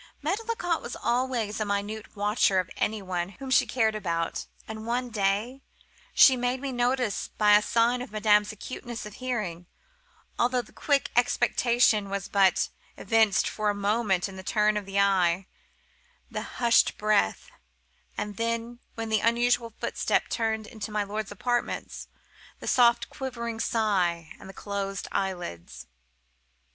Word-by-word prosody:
Medlicott 380 -1 -1
was 240 - -6
always 235 -3 -1
a 215 - 0
minute 205 +2 -3
watcher 205 -1 +2
of 185 -1 0
any 215 -1 -1
one 180 -1 -2
whom 270 -1 -7
she - - +4
cared 225 -4 +1
about; 170 -5 -2 0.2
and, 220 0 -7
one 245 +1 -1
day, 210 +5 0 0.5
she 265 - +7
made 245 +1 -1
me 275 0 -4
notice 245 -2 0
by 210 -1 +6
a 210 - +6
sign 235 +3 +2
madame's 210 -1 +3
acuteness 235 +2 -7
of 210 - -9
hearing, 210 -10 -4 0.7
although 245 0 +2
the - - -20
quick 285 -3 0
expectation 240 -3 +3
was 195 -1 -3
but 195 -2 +3 0.3
evinced 220 -4 +3
for 215 -1 -1
a 205 - 0
moment 205 -2 +1
in 190 -1 -10
the - - -6
turn 210 +2 +2
of 205 -2 -3
the 195 0 -1
eye, 190 -2 +3 0.9
the - - -3 0.2
hushed 235 -1 +4
breath—and 95 - -3
then, 230 +1 -2 0.2
when 225 -1 -4
the 220 -1 +2
unusual 235 +1 +2
footstep - - 0
turned 220 -2 -1
into 215 0 -7
my 210 -1 0
lord's 205 +1 -4
apartments, 240 +4 -2 0.5
the - - -9
soft 240 -2 +4
quivering 235 -4 -5
sigh, 185 -9 0
and 190 - -11
the - - -9
closed 200 -1 -4
eyelids. 85 - -4
215 Hz, 145 wpm, -27 LUFS, 200-240 Hz, 0.9 s, she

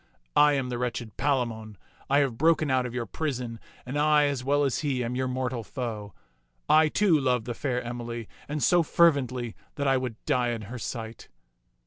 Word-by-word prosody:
I 150 0 +6
am 135 -3 -1
the 120 -1 -3
wretched 120 -2 -3
Palamon. 115 -7 -1 0.3
I 140 +1 +4
have 135 -5 0
broken 155 -2 +3
out 130 -1 +2
of 120 - -8
your 120 -2 -2
prison, 125 -3 -4 0.3
and 135 +4 -3
I, 150 0 +4
as 140 -3 -1
well 145 +2 +2
as 135 -3 0
he, 135 -5 -1
am 120 +1 -3
your 130 +1 -1
mortal 125 -2 -2
foe. 110 - -5 0.5
I, 155 0 +6
too, 180 -3 +3
love 125 -4 +1
the 120 - -3
fair 125 0 -2
Emily, 120 -1 -5 0.2
and 150 -2 -2
so 175 +8 +5
fervently 130 -8 +2 0.2
that 140 -2 -1
I 135 -1 +4
would 125 -3 -3
die 125 -1 +1
in 115 -2 -5
her 120 +5 -7
sight." 115 0 -6
125 Hz, 190 wpm, -27 LUFS, 120-145 Hz, 0.5 s, I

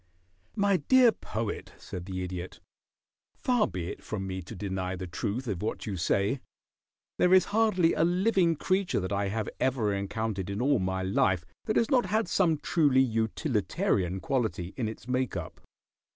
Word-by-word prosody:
"My 200 -2 +3
dear 245 - +5
Poet," 110 - -5
said 90 0 -8
the 95 -1 -3
Idiot, 90 0 -6 0.8
"far 245 -3 +2
be 85 -2 -5
it - - -9
from 100 -3 -4
me 95 0 -4
to 95 +6 -9
deny 95 -1 -3
the 95 +1 -5
truth 105 +8 -3
of 100 -6 -2
what 110 - -3
you 105 - -3
say. 100 +8 +1 0.8
There 180 +1 +6
is 185 - +5
hardly 210 -6 +3
a - - +2
living 180 -1 +3
creature 185 +4 0
that 95 0 -4
I 100 0 0
have 110 +1 -2
ever 120 -6 +1
encountered 100 0 -3
in 100 +1 -3
all 135 0 +3
my 95 0 -1
life 95 -2 +1 0.2
that 215 - 0
has 230 +4 +2
not 250 -6 +3
had 215 +3 +1
some 165 -5 +2
truly 145 -4 +3
utilitarian 110 - 0
quality 110 -6 -1
in 120 -4 -2
its 110 +2 -8
make 130 -1 0
up. - - -7
110 Hz, 170 wpm, -29 LUFS, -, 0.8 s, There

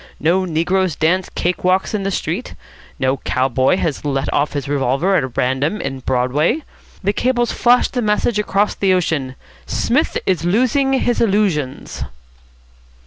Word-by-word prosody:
No 180 +4 +2
negroes 180 +1 0
dance 180 +3 +1
cake 180 +1 -1
walks 185 +4 +1
in 210 - -1
the 195 - -1
street. 185 +4 -3 0.4
No 130 +1 0
cow 130 0 0
boy 130 +6 +2
has 160 -6 -2
let 140 -1 -1
off 145 - +1
his 140 -3 -3
revolver 140 +7 +1
at 130 -7 -1
random 130 +10 0
in 135 -1 -4
Broadway. 130 - 0 0.4
The 200 +2 +1
cables 240 +1 +1
flash 245 +1 +3
the 250 - -3
message 210 0 +1
across 205 0 +1
the 190 -2 +2
ocean, 145 -7 -1 0.3
'Psmith 260 +7 0
is 185 -3 0
losing 255 +9 +2
his 245 -2 +1
illusions.'" 195 - 0
180 Hz, 150 wpm, -18 LUFS, 140-210 Hz, 0.4 s, flash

